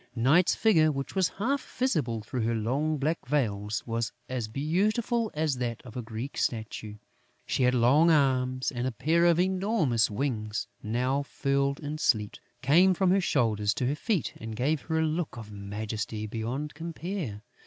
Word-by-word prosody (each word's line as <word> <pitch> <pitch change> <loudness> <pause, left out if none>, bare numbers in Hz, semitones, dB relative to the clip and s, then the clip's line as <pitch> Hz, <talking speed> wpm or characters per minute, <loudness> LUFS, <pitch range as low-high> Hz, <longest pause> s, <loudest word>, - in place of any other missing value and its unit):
Night's 145 +10 +4
figure, 160 -8 +4
which 135 -1 -4
was 190 -3 +2
half 265 +7 0
visible 145 - 0
through 125 +3 -3
her 115 +1 0
long 140 +8 0
black 155 +4 0
veils, 110 -7 -1
was 115 -1 -2 0.2
as 125 -4 -3
beautiful 210 - 0
as 150 -3 0
that 120 -2 -2
of 120 -4 -12
a 125 - -2
Greek 115 +4 -6
statue. 110 -2 -3 0.5
She - - -1
had 125 0 +4
long 135 +8 +5
arms 130 -4 +2
and 125 -1 -2
a - - -1
pair 160 +9 +2
of 170 -1 +4
enormous 185 - +2
wings, 110 -2 -2 0.2
now 125 +5 0
furled 140 0 0
in 150 +1 -4
sleep, 105 -7 +1 0.3
came 175 +8 +5
from 185 0 +3
her 195 +1 +4
shoulders 110 - +1
to 125 - -1
her 135 +4 +1
feet 190 - -1
and 110 0 -6
gave 140 +6 0
her 160 -1 -2
a - - +2
look 155 -6 -2
of 110 -2 -9
majesty 105 +1 -4
beyond 120 +7 -4
compare. 165 - -5
135 Hz, 170 wpm, -28 LUFS, 115-160 Hz, 0.5 s, long